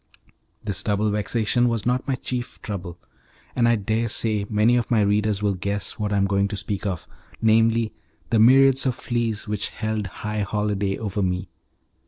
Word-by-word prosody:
This 100 -2 -3
double 105 0 0
vexation 115 +3 +1
was 115 -3 -2
not 125 +1 0
my 135 - +1
chief 125 -1 -5
trouble, 95 -5 -5 0.6
and 120 -2 +3
I 120 - +4
daresay 110 0 0
many 110 +3 +3
of 120 -2 0
my 115 -3 +3
readers 105 0 +1
will 100 -1 +2
guess 100 +2 -3
what 105 -1 -1
I 100 - +1
am 100 - +3
going 100 0 +1
to 105 - -5
speak 100 0 -2
of 90 -5 -4 0.3
namely, 115 0 +3 0.4
the 115 - +3
myriads 135 +3 +6
of 125 - 0
fleas 115 -3 -2
which 105 -1 -1
held 110 -1 -3
high 105 +2 -4
holiday 100 -1 -1
over 105 -2 -3
me. 90 0 -1
105 Hz, 175 wpm, -23 LUFS, 100-115 Hz, 0.6 s, myriads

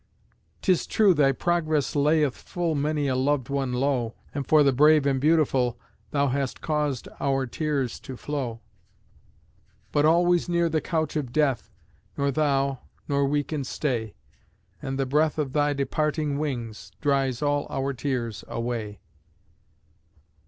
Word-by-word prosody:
'Tis 185 -3 +2
true 205 -4 +4
thy 145 -4 +4
progress 155 -1 0
layeth 150 -1 +3
Full 175 -2 -3
many 150 0 0
a 130 - +1
loved 130 0 0
one 135 -2 -1
low, 125 -2 0 0.2
And 140 -1 -4
for 155 -1 +6
the 140 -1 +3
brave 150 +2 +5
and 135 -2 +1
beautiful 140 -6 +2 0.3
Thou 140 -1 +1
hast 135 0 -2
caused 150 -5 -1
our 135 -1 +1
tears 140 -1 -2
to 130 - -9
flow; 125 -6 -4 1.3
But 145 0 +3
always 175 +2 +3
near 170 -1 +2
the 160 -1 0
couch 160 0 -2
of 140 -6 -2
death 140 -4 +1 0.5
Nor 140 0 +1
thou, 140 -2 +1 0.3
nor 140 -1 +1
we 145 +1 +1
can 150 -1 -4
stay; 120 -5 -2 0.7
And 135 0 -3
the 135 - 0
breath 150 +4 +1
of 140 -4 -2
thy 145 -1 +2
departing 145 +1 -1
wings 120 -7 -4
Dries 135 -2 0
all 145 0 +1
our 135 0 -2
tears 120 -3 -3
away! 115 -3 -4
140 Hz, 145 wpm, -26 LUFS, 130-150 Hz, 1.3 s, for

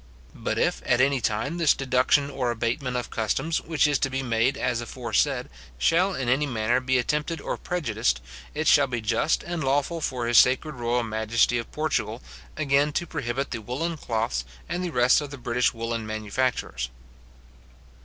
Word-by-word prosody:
But - - -3
if, - - +1
at 120 - +2
any 135 0 +3
time, 125 +11 -1
this 165 -3 +4
deduction 135 +2 +2
or 130 -3 -1
abatement 120 +3 -1
of 125 - -4
customs, 135 +9 -1
which 160 -2 +1
is 145 -2 +2
to 135 - +1
be 135 0 -2
made 120 +2 +1
as 120 -2 -1
aforesaid, 120 -2 -1 0.3
shall 180 - +2
in 130 - -3
any 135 +4 +2
manner 115 -1 +1
be 130 0 +1
attempted 150 +6 -1
and - - -5
prejudiced, 110 - 0 0.4
it 155 +1 -1
shall 140 -1 +6
be 120 -2 -2
just 115 +7 +1
and 170 -3 -3
lawful 145 +5 0
for 125 -5 -2
his 120 0 +6
sacred 130 +5 +3
royal 120 0 0
majesty 115 +2 +1
of 115 - -7
Portugal, 155 0 -1 0.4
again 145 +1 +2
to 175 - -1
prohibit 135 -2 -3
the 115 - -4
woollen 140 +10 -3
cloths, 110 - -2 0.2
and 175 +2 -2
the 180 - -2
rest 125 -1 +4
of 145 - -6
the 140 - -8
British 120 0 +1
woollen 115 -1 -4
manufactures. 110 - -2
130 Hz, 175 wpm, -26 LUFS, 115-145 Hz, 0.4 s, shall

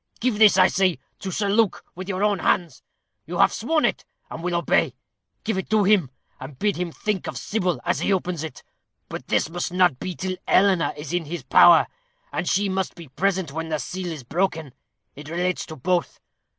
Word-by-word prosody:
Give 235 -3 0
this, 215 -3 +7
I 185 - +7
say, 185 -4 +2 0.2
to 195 - -5
Sir 205 +3 -1
Luke, 210 0 +1
with 185 +2 -8
your 190 +1 -1
own 205 -2 +2
hands. 175 -2 0 0.5
You - - -4
have - - +4
sworn 320 -2 +1
it, - - -1 0.3
and 165 - -6
will 175 0 -1
obey. 170 - +1 0.5
Give 220 -4 -1
it - - -6
to 215 -1 +3
him, 190 -8 +3 0.3
and 135 0 -9
bid 205 +4 0
him 175 -1 -3
think 205 +2 -3
of - - -5
Sybil 185 -5 -1
as - - +1
he - - 0
opens 180 -4 -1
it. 160 -5 -8 0.5
But - - -7
this - - +1
must 175 +2 -4
not 180 -7 +3
be 185 -2 -4
till 185 +1 -3
Eleanor 190 -3 +4
is 150 +2 -6
in 175 -2 0
his 160 -1 -6
power; 165 +6 +7 0.5
and 175 - -1
she 200 +2 +2
must 190 -1 -2
be 170 -5 -11
present 190 +1 -1
when 160 +2 -4
the 155 - 0
seal 180 +7 -5
is 160 -6 -6
broken. 160 -1 -2 0.4
It 145 +1 -10
relates 180 +2 -1
to 160 - -8
both. 175 +6 -1
180 Hz, 205 wpm, -23 LUFS, 165-195 Hz, 0.5 s, this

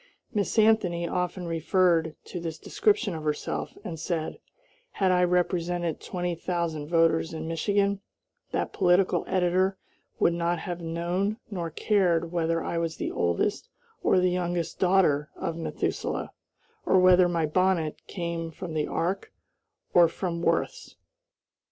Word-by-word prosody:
Miss 205 +1 -1
Anthony 205 -6 +3
often 180 0 -2
referred 165 -1 +2
to 180 - -6
this 165 -2 -5
description 405 - +1
of 160 -1 -5
herself, 150 -1 -3
and 165 -3 -6
said, 160 -1 -3 0.5
"Had 190 -2 +2
I 180 0 +4
represented 175 -1 0
twenty 180 -1 -3
thousand 170 -3 -3
voters 165 -1 +2
in 160 0 -5
Michigan, 200 +4 +1 0.5
that - - -2
political 185 0 +3
editor 185 +1 +1 0.4
would 170 - +3
not 170 0 0
have 175 +1 -5
known 175 +5 -1
nor 175 -4 -3
cared 170 -2 +1
whether 165 -1 0
I 170 - -2
was 165 -1 -2
the - - -3
oldest 85 - 0 0.3
or 185 - +3
the 180 0 +2
youngest 175 -2 -2
daughter 175 -6 +3
of 165 - -3
Methuselah, 165 - -3 0.5
or 190 - +3
whether 180 -1 +6
my 165 -2 +1
bonnet 170 -1 +1
came 170 -2 -4
from 165 0 -7
the 155 -1 0
ark 185 +4 -2 0.6
or 175 -1 +7
from 170 0 -3
Worth's." - - -1
175 Hz, 140 wpm, -27 LUFS, 165-185 Hz, 0.6 s, or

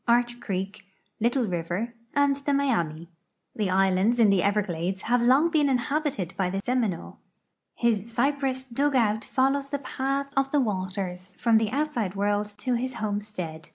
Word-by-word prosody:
Arch 240 0 +2
creek, 195 0 -4 0.4
Little 240 +3 +2
river, 180 +5 -3 0.2
and 285 -1 +4
the 280 +1 -2
^liami. 170 - 0 0.5
The 210 -3 0
islands 190 +5 +3
in 215 -3 +6
the 195 -2 +3
Everglades 190 -2 -1
have 245 +1 +2
long 270 +8 +4
been 300 -3 +3
inhabited 265 - -1
by 185 -2 0
the 195 +1 -2
Seminole. 225 -5 -2 0.6
His 230 -2 0
cy})ress 265 +1 0
dug 285 +2 +1
out 220 -3 +2
follows 275 +1 +1
the 280 -1 -3 0.2
])ath 275 +1 -1
of 270 0 +2
the 295 - +3
waters 185 -4 -2
from 230 -2 +4
the 220 -1 0
outside 250 -8 -1
world 205 +1 0
to 255 - -1
his 250 +1 -2
homestead. 205 -7 -4
230 Hz, 155 wpm, -26 LUFS, 195-270 Hz, 0.6 s, in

